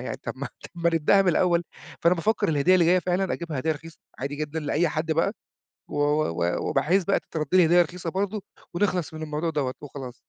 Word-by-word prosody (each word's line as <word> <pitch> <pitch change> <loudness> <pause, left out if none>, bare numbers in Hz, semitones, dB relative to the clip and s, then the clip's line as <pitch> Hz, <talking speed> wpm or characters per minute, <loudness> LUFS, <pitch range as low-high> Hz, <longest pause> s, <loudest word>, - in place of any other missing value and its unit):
يعني. - - -4
طَب - - -4
ما - - -5 0.3
ما 170 0 +1
نبدأها 165 +5 +4
من 190 - +1
الأول. 175 0 +3 0.4
فأنا 170 +2 +4
بافكّر 210 +4 0
الهدية 155 +4 +3
اللي 175 -2 +5
جاية 180 +2 +5
فعلًا، 180 +1 0
أجيبها 165 -5 -4
هدية 160 +4 +1
رخيصة 165 +2 -11 0.2
عادي 140 +2 -3
جدًا 155 +1 -3
لأي 155 +3 +1
حد 160 +1 -1
بقى 165 +5 +1 0.6
و - - -6
و 150 - +2
و 85 +1 -1
وبحيث 170 +8 +2
بقى 195 - +2
تترد 155 -2 -4
لي 180 -2 +7
هدية 175 +2 +6
رخيصة 175 0 -5
برضه، 200 +3 -2 0.3
ونخلص 180 -3 0
من 155 - -6
الموضوع 155 +2 -2
دوّة 140 -5 -1
وخلاص. 135 -4 -8
165 Hz, 210 wpm, -25 LUFS, 150-180 Hz, 0.6 s, لي